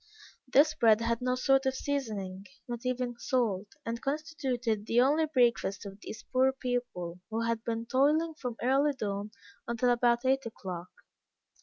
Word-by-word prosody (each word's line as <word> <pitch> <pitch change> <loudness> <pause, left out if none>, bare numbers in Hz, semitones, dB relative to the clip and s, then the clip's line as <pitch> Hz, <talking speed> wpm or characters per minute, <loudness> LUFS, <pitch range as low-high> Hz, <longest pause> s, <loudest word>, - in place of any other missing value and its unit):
This 300 +4 +6
bread 225 -6 +4
had 230 0 0
no 250 0 +1
sort 270 +1 +3
of 265 - 0
seasoning, 205 -10 -3 0.2
not 240 -1 -4
even 250 -1 -2
salt, 215 -6 0 0.2
and 230 0 -3
constituted 265 -7 -2
the 235 - +3
only 295 +5 +4
breakfast 235 -7 +1
of 195 0 -9
these - - -8
poor 260 +1 +4
people, 245 -10 -3
who 225 +1 -2
had 230 -1 -1
been 230 0 -2
toiling 300 +7 +2
from 250 -6 -5
early 275 +4 +3
dawn 205 -4 -3 0.4
until 240 +1 +2
about 240 0 +2
eight 270 +1 +3
o'clock. 180 -5 -7
240 Hz, 155 wpm, -30 LUFS, 220-265 Hz, 0.4 s, This